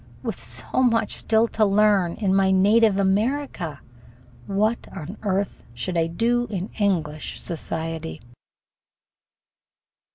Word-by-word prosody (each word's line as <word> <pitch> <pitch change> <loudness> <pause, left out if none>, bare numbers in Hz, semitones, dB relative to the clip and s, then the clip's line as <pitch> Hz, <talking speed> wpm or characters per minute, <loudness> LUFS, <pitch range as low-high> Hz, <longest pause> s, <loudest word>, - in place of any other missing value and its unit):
With - - -5
so - - -2
much 230 -3 +2
still 225 +1 +2
to 220 - +1
learn 200 -3 +3
in 195 -3 0
my 195 0 +4
native 205 +2 +4
America, 200 - 0 0.7
what 215 +4 0
on 175 +7 -6
earth 200 -2 -2
should 120 +10 -4
I 165 -1 +2
do 240 +8 0
in 195 -1 -4
English 160 -7 -1
society? 160 - -4
195 Hz, 110 wpm, -24 LUFS, 170-220 Hz, 0.7 s, my